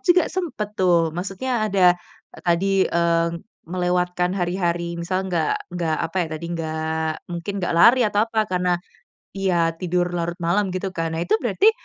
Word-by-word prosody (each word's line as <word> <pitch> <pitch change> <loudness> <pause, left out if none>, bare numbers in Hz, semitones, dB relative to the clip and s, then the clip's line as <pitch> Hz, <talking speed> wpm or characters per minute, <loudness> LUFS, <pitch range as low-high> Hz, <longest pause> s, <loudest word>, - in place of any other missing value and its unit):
juga 355 0 +6
sempat 330 - -3
tuh, 170 -3 +3
maksudnya 195 +8 -2
ada, 185 -3 +5 0.5
tadi, 190 +2 +2
eee, 170 0 +2 0.4
melewatkan 180 0 0
hari-hari 175 -1 -1
misal 185 +2 -1
nggak 165 -4 -1
nggak 170 -3 -1
apa 170 - -10
ya - - -5
tadi, 165 - -8
nggak 160 0 -2 0.2
mungkin 175 +3 -4
nggak 175 - -1
lari 235 +9 +7
atau 210 0 +2
apa, 220 -2 -1
karena 180 -1 +1 0.6
iya, 180 -4 +1
tidur 180 -1 0
larut 170 0 -2
malam 190 +4 +1
gitu 190 +1 -2
kan. 165 -2 -2
Nah 165 - -1
itu 180 +5 +1
berarti 255 - +4
180 Hz, 155 wpm, -22 LUFS, 170-195 Hz, 0.6 s, lari